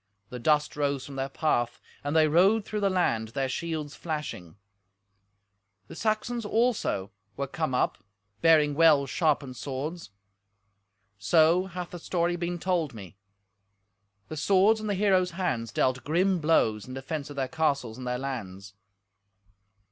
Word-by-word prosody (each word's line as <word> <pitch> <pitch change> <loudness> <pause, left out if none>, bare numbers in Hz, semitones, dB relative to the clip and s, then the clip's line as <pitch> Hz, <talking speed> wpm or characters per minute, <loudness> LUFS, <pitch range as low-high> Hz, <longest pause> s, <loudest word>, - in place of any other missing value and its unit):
The 125 - -7
dust 150 +3 +2
rose 140 -2 -1
from 140 - -9
their 135 0 -2
path, 120 -5 0 0.2
and 145 +2 -2
they 155 -1 +5
rode 195 +7 +4
through 210 - -3
the 200 -1 +2
land, 175 -12 +1
their 135 +4 -2
shields 155 0 -4
flashing. 150 - -5 1.3
The - - -9
Saxons, 230 +2 -1
also, 215 - 0 0.3
were 140 - -1
come 140 -1 -2
up, - - 0 0.4
bearing 155 -3 +5
well 150 -2 +5
sharpened 140 -3 0
swords. 140 +9 -5 1.1
So 165 - +4
hath 180 -1 -6
the 175 - -7
story 175 +1 0
been 175 0 -3
told 170 -7 -1
me. 95 -3 -10 1.1
The 155 - -7
swords 200 +7 +4
in 215 - -5
the 205 - 0
heroes' 185 -3 +2
hands 120 - -1
dealt 130 +2 0
grim 180 +4 +1
blows 115 -10 +2
in 130 - -7
defence 140 +2 -5
of 145 - -8
their 135 -1 -1
castles 135 -6 -1
and 125 - -6
their 125 0 -1
lands. 105 -7 -6
155 Hz, 150 wpm, -27 LUFS, 130-175 Hz, 1.3 s, they